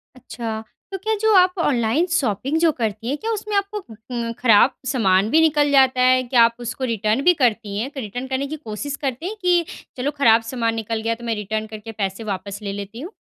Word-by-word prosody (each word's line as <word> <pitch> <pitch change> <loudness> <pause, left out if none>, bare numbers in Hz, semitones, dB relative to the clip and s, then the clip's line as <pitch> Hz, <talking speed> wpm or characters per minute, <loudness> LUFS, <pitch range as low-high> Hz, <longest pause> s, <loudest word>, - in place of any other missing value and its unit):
अच्छा, 230 -3 -6 0.3
तो 385 - -3
क्या 435 +4 -1
जो 440 0 +3
आप 365 -1 +5
ऑनलाइन 260 0 +1
शॉपिंग 270 - 0
जो 330 -1 +4
करती 225 -4 -3
हैं 285 - -1
क्या 450 +8 -3
उसमें 425 -1 -3
आपको 400 0 -1 0.3
म 235 -1 -2
खराब 240 +2 +5
सामान 205 -6 +2
भी 320 +6 +4
निकल 295 -2 +3
जाता 265 -2 +4
है, 255 0 +5
क्या 245 -1 +3
आप 230 0 +3
उसको 240 +2 -5
रिटर्न 215 +3 0
भी 360 - +6
करती 215 -4 0
हैं? 245 +5 -2
तो 285 - -7
रिटर्न 245 +4 -5
करने 265 +1 -2
की 310 - -5
कोशिश 280 0 -5
करते 270 +2 -3
हैं 410 +4 -3
कि 355 -2 +3 0.3
चलो 265 +3 -1
खराब 230 -4 +5
सामान 230 -3 -1
निकल 225 0 -3
गया 230 +1 -1
तो 240 - -14
मैं 230 -1 -1
रिटर्न 215 +1 -3
करके 215 +1 -8
पैसे 195 +3 -3
वापस 195 +1 -5
ले 200 -1 -4
लेती 205 +4 -7
हूँ? 345 +6 -7
245 Hz, 220 wpm, -21 LUFS, 220-295 Hz, 0.3 s, भी